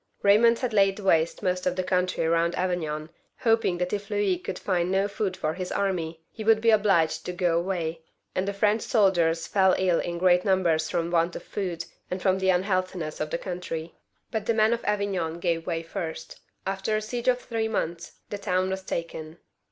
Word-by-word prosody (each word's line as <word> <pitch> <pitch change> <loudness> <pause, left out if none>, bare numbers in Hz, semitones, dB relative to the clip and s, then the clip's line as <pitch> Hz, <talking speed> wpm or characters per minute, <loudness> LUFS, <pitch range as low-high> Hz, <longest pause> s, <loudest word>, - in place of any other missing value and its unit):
Baymond 230 +4 +6
had 245 -2 -2
laid 195 -2 +4
waste 170 -2 +2
most 180 -1 0
of 180 - +1
the 185 - -1
country 180 -2 0
round 170 +1 +2
Avignon, 160 -4 -2 0.3
hoping 225 -6 +2
that 180 +2 -2
if 205 -1 -3
Louis 205 -4 +1
could 180 - -5
find 180 -2 0
no 195 +1 +2
food 200 -2 -3
for 155 - -1
his 180 +1 -5
army, 165 -5 -2
he 220 - -7
would 220 0 +5
be 230 0 +4
obliged 200 -7 +3
to - - -1
go 175 -2 +1
away; 170 -2 -2 0.3
and 185 +1 -1
the - - +1
French 210 +2 +2
soldiers 175 -7 +2
fell 190 -2 +3
ill 185 -3 +2
in 170 0 -3
great 180 0 +4
num 190 -2 +2
bers 160 -2 +1
from 170 -1 -1
want 170 0 +1
of - - -6
food 175 -5 -4 0.2
and 180 - -3
from 190 0 +2
the 190 0 +1
unhealthiness 185 -3 0
of 155 - -2
the - - -1
country. 170 -3 -5 0.4
But 220 -2 -3
the 230 - +2
men 220 +1 +4
of 235 - -3
Avignon 195 -5 -1
gave 170 -2 -1
way 165 -2 -1
first. 165 -2 -6 0.3
After 195 +2 -1
a - - -2
siege 240 +3 -4
of 250 -1 +4
three 225 -3 -2
months, 170 -6 -3 0.2
the 205 - -3
town 185 0 0
was 190 0 -3
taken. 165 -3 -5
185 Hz, 205 wpm, -26 LUFS, 170-200 Hz, 0.4 s, Baymond